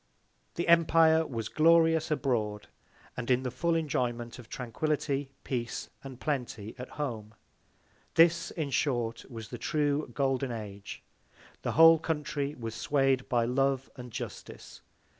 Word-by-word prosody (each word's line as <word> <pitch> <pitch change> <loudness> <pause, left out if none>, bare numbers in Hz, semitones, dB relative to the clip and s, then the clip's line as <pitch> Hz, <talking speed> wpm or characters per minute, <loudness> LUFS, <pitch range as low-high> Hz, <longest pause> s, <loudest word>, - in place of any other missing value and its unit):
The 170 - -2
Empire 165 -1 +5
was 115 -4 -4
glorious 165 0 +4
abroad, 110 -8 -1 0.5
and 125 0 -5
in 125 0 +3
the 125 - -2
full 170 +6 0
Enjoyment 125 -6 -2
of 115 - -13
Tranquility, 140 +2 -2
Peace 120 -3 -4
and 135 -2 -9
Plenty, 125 -8 -3
at 125 - -7
home: 110 -7 -4 0.8
This, 165 0 +5
in 150 -4 -4
short, 120 -4 0
was 110 -4 -8
the - - -7
true 150 -1 0
golden 135 -2 0
Age. 105 -3 -7 0.6
The - - -2
whole 165 0 +8
Country 150 -2 -2
was 115 -2 -6
sway'd 135 +2 +1
by 120 -3 +2
Love 135 +2 0
and 125 -2 -9
Justice. - - -8
135 Hz, 135 wpm, -30 LUFS, 120-155 Hz, 0.8 s, whole